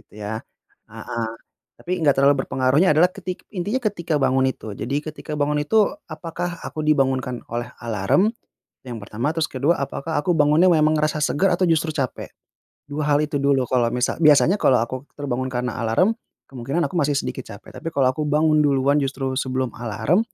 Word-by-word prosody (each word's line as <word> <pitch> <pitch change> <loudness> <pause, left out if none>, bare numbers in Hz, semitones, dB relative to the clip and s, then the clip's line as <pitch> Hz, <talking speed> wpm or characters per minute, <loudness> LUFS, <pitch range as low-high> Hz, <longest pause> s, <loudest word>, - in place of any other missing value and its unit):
Itu 110 - -29
ya, 110 +2 -4 0.5
heeh. 115 - -5 0.6
Tapi 180 - -5
nggak 145 - +6
terlalu 140 -1 +4
berpengaruhnya 135 +7 +3
adalah 170 +4 +5
ketik 185 -1 -6
intinya 205 +8 -1
ketika 170 -8 -1
bangun 130 0 +2
itu. 110 -5 -8
Jadi 135 +5 -3
ketika 155 0 -8
bangun 150 0 +1
itu 215 +5 +3 0.2
apakah 170 +2 -5
aku 155 - -5
dibangunkan 130 -4 +1
oleh 120 +1 -4
alarm? 115 - +2 0.6
Yang 120 -2 -6
pertama, 115 +7 -2
terus 165 -2 0
kedua, 140 +6 +1
apakah 155 +3 -4
aku 175 - 0
bangunnya 150 +5 +5
memang 155 -1 +3
ngerasa 155 0 0
segar 185 +6 +2
atau 185 - +1
justru 160 0 +1
capek? 135 -4 -3 0.6
2 150 +1 -2
hal 145 0 +3
itu 145 -2 -2
dulu. 140 -1 +2
Kalo 125 -2 +2
misa 125 +4 -1
biasanya 155 +5 +5
kalau 130 - +4
aku 120 +3 -5 0.2
terbangun 130 -3 -3
karena 125 -2 -3
alarm 115 - +2 0.4
kemungkinan 135 +6 -2
aku 185 - -8
masih 145 -1 +1
sedikit - - -3
capek, - - -11
tapi - - -7
kalau 130 -3 +3
aku 150 +3 -3
bangun 155 +1 +3
duluan 140 0 +3
justru 135 -1 -2
sebelum 130 -2 -2
alarm, 120 - 0
145 Hz, 175 wpm, -22 LUFS, 130-160 Hz, 0.6 s, nggak